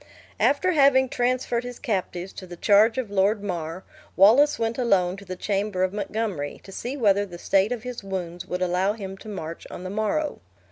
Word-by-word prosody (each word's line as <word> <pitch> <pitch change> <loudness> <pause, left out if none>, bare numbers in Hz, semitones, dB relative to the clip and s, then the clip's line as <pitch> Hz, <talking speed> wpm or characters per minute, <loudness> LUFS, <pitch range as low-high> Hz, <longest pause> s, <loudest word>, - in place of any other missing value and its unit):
After 330 +6 +3
having 275 -4 +4
transferred 245 -1 0
his 245 0 -7
captives 190 -6 -3
to 185 - -9
the 175 - -8
charge 215 +5 +4
of 240 -6 -3
Lord 200 +1 +2
Mar, 175 -2 -4 0.3
Wallace 245 +10 +6
went 225 +1 -2
alone 190 -7 +2
to 200 - -11
the 185 - -5
chamber 200 0 -1
of 185 +1 0
Montgomery, 205 -7 -3
to 195 - -12
see 250 +8 -5
whether 205 -5 +3
the 180 -4 -8
state 195 +4 +2
of 240 -2 -3
his 250 -4 -6
wounds 180 -3 -5
would 180 +1 -2
allow 185 +3 +1
him 195 -3 -7
to 215 - -10
march 165 -5 -6
on - - -8
the 185 - -5
morrow. 290 +9 -1
205 Hz, 195 wpm, -25 LUFS, 185-240 Hz, 0.3 s, Wallace